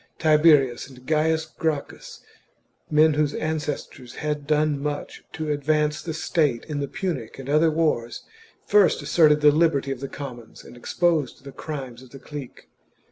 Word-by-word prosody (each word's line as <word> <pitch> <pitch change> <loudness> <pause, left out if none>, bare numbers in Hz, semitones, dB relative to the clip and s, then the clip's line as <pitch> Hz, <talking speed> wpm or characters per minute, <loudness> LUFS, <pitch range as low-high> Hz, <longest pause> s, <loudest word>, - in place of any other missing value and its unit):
Tiberius 150 -5 +4
and 130 -1 -15
Gains 160 +1 +1
Gracchus 160 -3 -4 0.4
— - - -44
men 155 0 +6
whose 150 -1 0
ancestors 150 -5 -4
had 150 -1 -3
done 150 -2 +1
much 145 0 -5
to 155 -1 -3
advance 150 +1 0
the 160 -2 -5
state 150 -6 0
in 150 -2 -4
the 140 - -2
Punic 135 -10 -4
and 135 -1 -9
other 155 +3 +3
wars 150 -7 -1 0.2
— - - -32
first 205 -2 +3
asserted 150 -3 +4
the 150 0 +7
liberty 150 -3 +1
of 135 - -4
the 135 0 -6
commons 120 -5 -9
and - - -13
exposed 150 +1 -1
the 140 - -9
crimes 130 -4 -7
of 130 - -15
the 135 - -11
clique. 145 -4 -9
150 Hz, 165 wpm, -24 LUFS, 135-155 Hz, 0.4 s, the